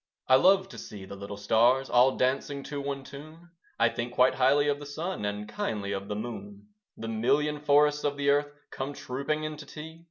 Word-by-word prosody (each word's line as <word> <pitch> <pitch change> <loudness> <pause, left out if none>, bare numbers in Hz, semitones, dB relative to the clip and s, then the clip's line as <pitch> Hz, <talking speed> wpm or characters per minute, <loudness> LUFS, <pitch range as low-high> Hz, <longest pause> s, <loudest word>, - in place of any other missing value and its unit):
I - - +4
love 190 +7 +5
to - - -9
see 100 -2 -9
the 100 - -9
little 100 +1 -7
stars 120 +6 +3
All 125 +2 +4
dancing 135 +2 0
to 140 +1 -5
one 140 -1 -4
tune; 155 +5 -12 0.3
I 115 - +5
think 120 +1 -4
quite 125 +1 +4
highly 140 +3 +3
of 145 0 +1
the 145 - -8
Sun, 155 - -4
And 105 +1 -3
kindly 105 - -3
of 100 0 -4
the 105 - -3
Moon. 200 - -7 0.3
The 115 - -6
million 145 +7 +1
forests 150 0 +3
of 145 -1 -1
the 140 0 +3
Earth 145 0 +1 0.2
Come 135 +2 -4
trooping 140 +4 -3
in 155 0 -4
to 150 - -10
tea. 160 +2 -9
140 Hz, 210 wpm, -28 LUFS, 120-150 Hz, 0.3 s, love